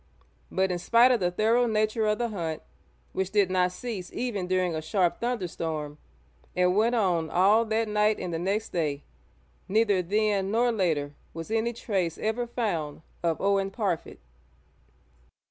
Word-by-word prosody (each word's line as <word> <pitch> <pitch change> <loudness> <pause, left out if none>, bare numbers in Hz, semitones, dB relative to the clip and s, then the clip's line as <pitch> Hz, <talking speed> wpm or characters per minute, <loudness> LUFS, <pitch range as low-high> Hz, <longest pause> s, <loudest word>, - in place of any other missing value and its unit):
But 190 0 +1
in 175 - -2
spite 235 +7 +5
of 245 - +3
the 180 -2 +1
thorough 225 +6 +2
nature 215 0 +1
of 210 0 +2
the 235 +1 -1
hunt, 165 -7 -4 0.5
which 190 -1 -1
did 200 -2 +2
not 180 -1 +2
cease 200 -3 -6
even 210 -7 -3
during 185 -1 +1
a 160 - -2
sharp 175 +2 0
thunderstorm, 165 -10 -3 0.6
and 180 0 +3
went 230 +4 +3
on 175 -7 +1
all 205 +6 +4
that 220 0 0
night 210 0 +2
and 175 - -4
the 165 - -2
next 200 +5 -1
day, 150 -4 -2 0.6
neither 205 -2 +3
then 200 +1 +1
nor 235 +3 +2
later 160 -9 0 0.2
was 165 +5 -6
any 225 +1 +1
trace 190 -8 -2
ever 225 +3 -1
found 170 -12 -3 0.2
of 165 -2 0
Owen 195 0 +1
Parfitt. 195 -5 -3
195 Hz, 160 wpm, -27 LUFS, 175-220 Hz, 0.6 s, spite